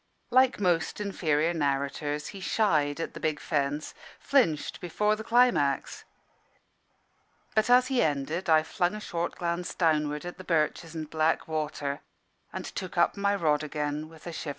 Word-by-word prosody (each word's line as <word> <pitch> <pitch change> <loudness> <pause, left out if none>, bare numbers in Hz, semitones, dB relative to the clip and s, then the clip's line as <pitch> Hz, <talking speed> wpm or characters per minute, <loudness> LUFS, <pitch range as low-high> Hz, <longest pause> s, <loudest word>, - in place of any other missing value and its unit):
Like 260 -1 +4
most 175 -3 +1
inferior 165 -5 0
narrators, 145 0 -1
he 200 - -8
shied 160 -8 +1
at 165 - -4
the - - -8
big 155 -2 -1
fence, 145 -1 -2 0.3
flinched 235 - +1
before 210 +5 +1
the 220 - -7
climax. 230 - +2 1.5
But 215 +2 +2
as 250 +1 +6
he 255 -1 +1
ended, 155 +4 -1
I 155 -1 +5
flung 175 +4 -1
a - - -5
short 170 -4 -3
glance 175 0 -3
downward 150 -2 +1
at 175 - -7
the - - -8
birches 165 -1 0
and 155 -1 -4
black 155 +1 0
water, 150 -2 -3 0.5
and - - -5
took - - -6
up - - +3
my 200 0 +1
rod 155 -6 +2
again 150 0 -3
with 160 -1 -16
a 175 - -5
shiver. 160 - -5
160 Hz, 160 wpm, -28 LUFS, 150-190 Hz, 1.5 s, as